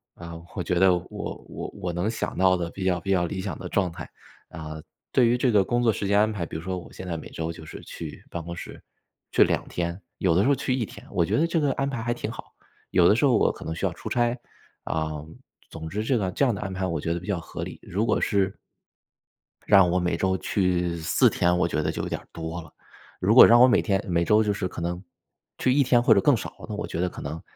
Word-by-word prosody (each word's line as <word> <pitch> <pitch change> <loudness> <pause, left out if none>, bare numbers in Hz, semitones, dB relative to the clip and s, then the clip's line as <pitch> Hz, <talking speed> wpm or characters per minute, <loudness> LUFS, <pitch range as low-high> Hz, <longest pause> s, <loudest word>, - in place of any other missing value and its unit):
啊， 85 -1 -9
我 90 - -2
觉 90 - -1
得 95 -1 +5
我 90 - -5 0.4
我 - - -6
我 90 -1 -3
能 90 +5 -1
想 115 - -3
到 95 0 +4
的 85 -1 -3
比 95 - -6
较 90 -1 +2
比 95 +3 -3
较 90 -2 +3
理 95 +2 -4
想 - - -4
的 - - -6
状 95 -4 +1
态， - - -9 0.4
啊， 80 -1 -7 0.3
对 125 -2 +4
于 120 +1 +3
这 125 0 +2
个 105 -3 +5
工 120 +4 0
作 115 - +4
时 100 - -3
间 100 +1 +3
安 110 +1 +3
排， 90 -5 -3
比 - - -9
如 80 - -8
说 95 0 -3
我 85 - -13
现 95 - -8
在 85 - -2
每 80 - -9
周 80 0 -4
就 80 - -11
是 80 - -9
去 - - -8
办 85 - -4
公 85 +1 -6
室， - - -9 0.5
去 - - +6
2 - - -1
天， 85 +2 -3 0.2
有 90 -4 +3
的 95 - +4
时 125 - +2
候 140 - +4
去 130 - -1
1 120 -4 -1
天， - - -13
我 85 - +2
觉 - - 0
得 160 - +3
这 170 -1 0
个 145 -2 +2
安 135 0 -1
排 135 -4 -4
还 120 +1 -1
挺 120 - -5
好。 - - -10 0.4
有 90 -1 +5
的 - - +5
时 120 - +2
候 130 -4 +4
我 - - +3
可 - - -11
能 80 - -3
需 - - -2
要 - - +1
出 - - -9
差， 120 +1 +1 0.5
啊， 80 -1 -1 0.6
总 80 0 -7
之 105 +5 -2
这 125 +3 +1
个 95 -4 -1
这 140 - +2
样 120 -5 +1
的 105 - -6
安 95 -2 -4
排 95 0 -2
我 85 -2 -2
觉 85 - -1
得 85 - -3
比 90 - -12
较 100 -4 -1
合 - - -8
理。 - - -7
如 100 +5 -1
果 - - +1
是 100 -2 +1 1.1
让 95 -3 +6
我 90 - +2
每 90 -1 0
周 95 +1 +1
去 90 -3 0
4 80 - +3
天， 90 0 +2
我 - - +2
觉 - - -1
得 - - 0
就 - - -4
有 - - -3
点 - - -3
儿 - - -23
多 80 +1 -5
了， 80 - -15 0.5
如 105 +5 +3
果 - - +11
让 120 +1 +7
我 125 - +9
每 120 - +4
天 100 -3 0
每 85 -2 +1
周 105 +3 +4
就 105 -1 +1
是 100 -1 -3
可 90 - -7
能 85 +2 -3 0.5
去 130 - +2
1 140 0 +4
天 120 -2 +4
或 120 - +6
者 100 - +3
更 140 -5 +4
少， - - -6 0.2
那 - - -3
我 - - -4
觉 85 - -3
得 90 - +1
可 - - -9
能 80 +1 -5
95 Hz, 290 characters per minute, -25 LUFS, 85-110 Hz, 1.1 s, 果